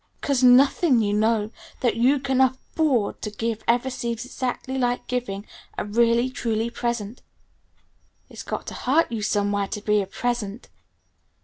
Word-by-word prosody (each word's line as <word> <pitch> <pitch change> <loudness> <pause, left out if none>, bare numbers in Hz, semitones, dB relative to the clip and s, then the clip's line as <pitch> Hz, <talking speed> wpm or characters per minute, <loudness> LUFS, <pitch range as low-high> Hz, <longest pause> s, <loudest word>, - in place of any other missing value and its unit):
'Cause 275 -3 0
nothing, 260 +2 +5
you 205 -1 0
know, 215 0 +1 0.3
that 240 -3 +2
you 250 +5 +3
can 265 -1 +1
afford 260 -2 0
to 210 - -3
give 225 +1 -3
ever 245 +3 +2
seems 235 -2 -4
exactly 255 0 -4
like 245 -1 0
giving 220 -5 -3 0.3
a - - -2
really, 235 +3 +2
truly 235 -3 -2
present. 235 -2 -3 1.1
It's - - -10
got - - -5
to - - -6
hurt 290 +3 +1
you 225 -2 -3
somewhere 205 -1 0
to 210 - -5
be 210 0 +2
a 195 - -5
'present'. 235 0 -3
235 Hz, 150 wpm, -24 LUFS, 210-255 Hz, 1.1 s, nothing